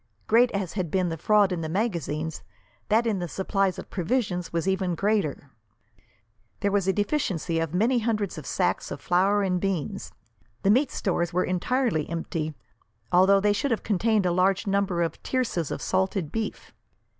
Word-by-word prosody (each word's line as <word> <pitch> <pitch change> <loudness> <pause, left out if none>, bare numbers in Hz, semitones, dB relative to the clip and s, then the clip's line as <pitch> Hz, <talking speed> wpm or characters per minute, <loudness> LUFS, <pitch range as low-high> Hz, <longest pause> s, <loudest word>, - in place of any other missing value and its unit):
Great 240 +3 +5
as 195 -5 -3
had 185 -5 -2
been 185 +1 +1
the 165 - -2
fraud 205 +4 +3
in 175 -2 -2
the 160 - -3
magazines, 160 - -2 0.5
that 225 +3 +3
in 215 -4 0
the 175 - -3
supplies 190 +2 0
of - - -9
provisions 180 -2 -1
was 170 +2 -1
even 190 -2 0
greater. 195 -8 -1 1.1
There 200 - +1
was 200 -2 +1
a - - +5
deficiency 195 - -1
of 165 +1 -2
many 235 +6 +3
hundreds 215 -6 -1
of 145 - -10
sacks - - 0
of - - -6
flour 195 +3 +2
and 180 -2 0
beans. 190 -7 -2 0.5
The 195 - +4
meat 265 +6 +3
stores 175 -2 -1
were 180 - +2
entirely 185 - 0
empty, 165 -2 -3 0.6
although 190 +2 +5
they 205 +1 +3
should 240 +8 -1
have 230 - -1
contained 215 0 +1
a 180 - +2
large 185 +3 +2
number 195 -3 +1
of 165 -2 -4
tierces 230 - -1
of - - -4
salted 190 -3 0
beef. 225 -1 -4
190 Hz, 175 wpm, -26 LUFS, 175-210 Hz, 1.1 s, Great